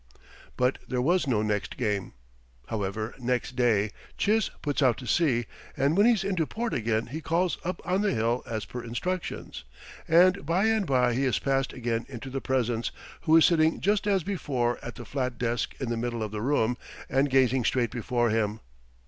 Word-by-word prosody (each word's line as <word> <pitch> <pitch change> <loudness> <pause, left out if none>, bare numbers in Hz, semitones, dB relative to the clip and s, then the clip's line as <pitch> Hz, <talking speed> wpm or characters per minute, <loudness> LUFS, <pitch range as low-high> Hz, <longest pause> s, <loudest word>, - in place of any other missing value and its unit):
But 125 +1 +1
there 125 - -1
was 170 +5 +2
no 110 -5 +2
next 105 -1 -2
game. 105 -5 -1 0.6
However, 110 +1 -3
next 125 0 -1
day 110 -4 +2 0.3
Chiz 215 +1 +2
puts 145 -1 -1
out 130 -4 +4
to 130 - -8
sea, 125 -5 +2 0.3
and 140 +4 +2
when 205 +4 +5
he's 225 -6 +3
into 185 -5 0
port 235 +1 -3
again 115 -1 0
he 150 +7 -6
calls 170 +3 0
up 180 +2 -3
on 185 +2 +1
the 210 - +2
hill 115 +2 0
as 110 -3 -3
per 125 -1 -7
instructions. 120 - -4 0.4
And 185 +4 +5
by 170 +7 +1
and 220 -4 +2
by 125 -3 +3
he 135 +3 +1
is 130 - +2
passed 135 -1 0
again 115 -2 -2
into 130 0 -7
the 135 0 -3
presence, 120 -3 0 0.4
who 160 0 +6
is 165 - +7
sitting 160 -1 +3
just 205 +1 +1
as 195 -4 +2
before 130 -11 -1
at 120 - -7
the 120 - -9
flat 130 -2 -2
desk 120 -1 -1
in 130 - -3
the 120 - -1
middle 120 -1 -2
of 105 - -4
the 105 -1 -4
room, 125 -2 +1 0.3
and 135 +2 +2
gazing 130 -1 +3
straight 120 -1 +1
before 120 -1 0
him. 110 -1 0
125 Hz, 190 wpm, -27 LUFS, 115-165 Hz, 0.6 s, is